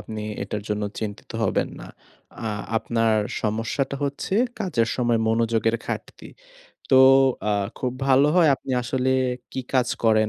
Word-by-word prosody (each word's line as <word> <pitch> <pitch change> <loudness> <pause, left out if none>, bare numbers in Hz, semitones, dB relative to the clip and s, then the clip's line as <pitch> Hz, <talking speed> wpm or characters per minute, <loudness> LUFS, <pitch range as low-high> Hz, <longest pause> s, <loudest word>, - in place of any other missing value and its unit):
আপনি 110 -1 -7 0.2
এটার 105 +1 -4
জন্য 105 0 -1 0.2
চিন্তিত 105 -2 -6
হবেন - - +1
না। - - -9 0.6
আ - - -2 0.3
আপনার 115 -1 +1 0.3
সমস্যাটা 115 +6 -1
হচ্ছে 140 +7 -3 0.3
কাজের 135 - 0
সময় 120 -2 +1
মনোযোগের 115 0 +1
ঘাটতি। - - -6 0.6
তো 135 - +6 0.5
আ - - +2 0.3
খুব 125 -1 -2
ভালো 135 +1 +5
হয় 170 -4 +6
আপনি 135 - -9
আসলে 130 +1 -1 0.4
কি 130 - -3
কাজ 125 -2 +3 0.2
করেন 110 -1 +4
115 Hz, 140 wpm, -24 LUFS, 110-130 Hz, 0.6 s, তো